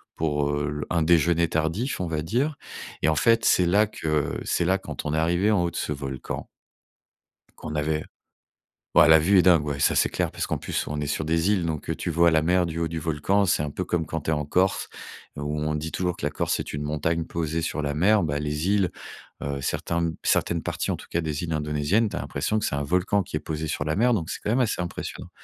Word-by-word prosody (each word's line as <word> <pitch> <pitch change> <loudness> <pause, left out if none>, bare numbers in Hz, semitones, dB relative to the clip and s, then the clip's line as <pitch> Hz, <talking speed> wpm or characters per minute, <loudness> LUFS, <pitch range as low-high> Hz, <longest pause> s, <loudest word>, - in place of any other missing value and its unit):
pour, 75 -2 0
heu, 75 0 -2
un 85 -2 +1
déjeuner 85 +1 +3
tardif, 80 - -1
on 90 - -2
va 80 -2 -2
dire. 130 - -1 0.4
Et - - +2
en 80 - +3
fait, 115 +2 +3
c'est 90 - +4
là 100 +4 +4
que 75 -7 -1
c'est 85 - 0
là, 95 +2 +3
quand - - -7
on 75 - -1
est - - +1
arrivés 85 +5 +2
en 100 -5 +3
haut 85 - -1
de - - -7
ce 75 - -1
volcan 65 -2 -5 1.1
qu'on 75 - -6
avait 75 +1 -1 0.9
ouais, - - +7
la 80 - +9
vue 95 +5 +4
est - - +7
dingue, 85 -4 +5
ouais, 70 -1 -3
ça, - - +3
c'est - - +3
clair - - -1
parce - - -3
qu'en - - -2
plus, - - -2
on 75 0 -3
est 75 - -2
sur 75 +2 -2
des 80 +4 +1
îles, 90 -5 +1
donc 80 -1 -4
heu, 80 - 0
tu 85 - -3
vois 85 +1 +4
la 80 -1 +3
mer 90 +1 +2
du 80 - -5
haut 85 0 0
du 80 0 -4
volcan. 80 +6 +1
C'est 85 -5 +2
un 75 - -3
peu 90 - -3
comme 85 -2 -1
quand 80 0 -4
tu 75 - -4
es 80 - +3
en 75 -1 -1
Corse. 90 +6 +1 0.5
Où 75 +1 -3
on 75 0 -1
dit 75 +1 -3
toujours 90 -1 -1
que - - -5
la - - +1
Corse, 75 - -1
c'est - - -4
une 75 0 -3
montagne 80 +3 -1
posée 80 -1 -2
sur 75 - -2
la 75 0 -2
mer. 100 +7 +4
Ben, 75 -3 -1
les 75 +3 -2
îles, 100 -4 +2 0.5
heu, 70 0 -3
certains 85 +4 -1
certaines 85 -1 +1
parties, - - -2
en - - -2
tout - - -12
cas, 85 - 0
des 80 +1 -3
îles 85 - -4
indonésiennes, 75 +8 +1
tu - - -6
as - - -2
l'impression 95 +10 -1
que - - -2
c'est - - -1
un 70 - -1
volcan 90 +6 +1
qui 75 - -4
est - - -4
posé 80 0 -4
sur 70 - -2
la 80 +2 0
mer, 120 +4 +3
donc 85 -7 -1
c'est - - -4
quand 105 - 0
même 125 - +2
assez 110 -7 +1
impressionnant. 85 - -6
80 Hz, 255 wpm, -25 LUFS, 75-90 Hz, 1.1 s, la